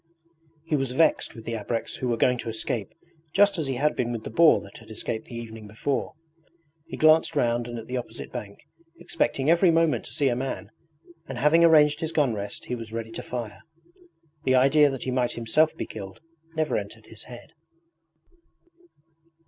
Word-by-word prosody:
He 160 - 0
was 135 -3 -1
vexed 160 +5 +2
with 115 -1 -11
the 115 - -3
ABREKS 115 +2 -3
who 130 - -3
were 120 -1 0
going 125 +1 +2
to 115 - -4
escape 110 -2 -3 0.4
just 200 -2 +4
as 155 - -2
he 135 - -2
had 150 +4 +1
been 120 -1 -1
with 115 -2 -4
the - - -7
boar 160 +7 +6
that 100 - -12
had 110 - -16
escaped 110 +1 -5
the 120 - -9
evening 115 -2 -8
before. 110 +6 -3 0.7
He - - -7
glanced 155 +1 +4
round 120 -3 +1
and 120 0 -6
at 115 - -7
the 125 +2 -3
opposite 70 - -7
bank, - - -8 0.3
expecting 135 +1 -1
every 170 +3 +5
moment 165 -1 +2
to - - -10
see 140 - +1
a 120 - 0
man, 130 +2 -4 0.6
and 135 - -6
having 150 +6 +4
arranged 150 -2 +5
his 160 0 -3
gun 145 -7 +2
rest 100 -1 -6
he - - -4
was 115 -2 -6
ready 115 0 -5
to - - -6
fire. 115 -4 -6 0.8
The 130 - +3
idea 140 +3 +5
that 135 -2 -5
he 130 - -2
might 125 -1 0
himself 120 +8 +1
be - - -3
killed 95 -3 -9 0.4
never 155 -1 0
entered 110 +2 -7
his 110 - -13
head. 120 -1 -12
125 Hz, 195 wpm, -26 LUFS, 115-150 Hz, 0.8 s, boar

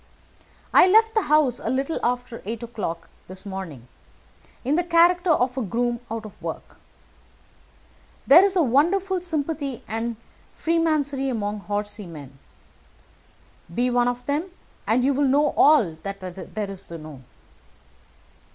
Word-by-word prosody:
I - - +8
left 445 +3 +5
the 435 - +3
house 300 - +2
a - - -4
little 270 +5 -1
after 245 -1 -2
eight 225 +3 -5
o'clock 210 -8 -5 0.2
this 185 +2 -10
morning 180 - -7 0.8
in 275 - +1
the 350 +3 +2
character 350 +1 +3
of 255 -4 +2
a - - -1
groom 235 +3 -1
out 225 0 -5
of 215 - -12
work. - - -7 1.5
There 325 +7 +8
is 395 -1 +2
a 350 - +4
wonderful 355 +9 +2
sympathy 300 -6 -3
and 225 +1 -3 0.4
freemasonry 305 -5 0
among 210 -4 -2
horsey 205 0 -4
men. 140 -5 -11 1.3
Be 245 +7 0
one 245 0 +2
of 245 0 -3
them, 290 +5 -1 0.4
and 240 +3 +2
you 275 +2 +3
will 280 +1 +2
know 290 +3 +3
all 245 - +5
that 195 +3 -6
there 195 +2 -6
is 195 - -7
to 170 - -7
know. 155 -4 -11
245 Hz, 140 wpm, -24 LUFS, 205-305 Hz, 1.5 s, I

